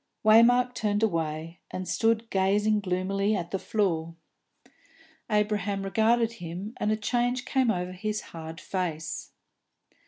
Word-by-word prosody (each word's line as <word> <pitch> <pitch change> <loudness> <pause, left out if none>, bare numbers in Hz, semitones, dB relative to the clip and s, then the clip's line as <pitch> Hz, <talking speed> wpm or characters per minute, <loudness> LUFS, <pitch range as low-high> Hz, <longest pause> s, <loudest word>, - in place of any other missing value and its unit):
Waymark 245 +3 +6
turned 210 -2 0
away, 165 -3 -1
and 185 0 -5
stood 225 0 +1
gazing 205 +3 +2
gloomily 195 +2 0
at 175 -3 -4
the 195 - -1
floor. 170 -7 -1 1.1
Abraham 205 -2 0
regarded 225 +3 +2
him, 185 0 -7
and 210 - 0
a 215 - +1
change 245 +3 0
came 260 -3 +2
over 180 -3 -1
his 210 +3 -3
hard 165 0 -7
face. 170 -4 -4
205 Hz, 125 wpm, -27 LUFS, 180-220 Hz, 1.1 s, Waymark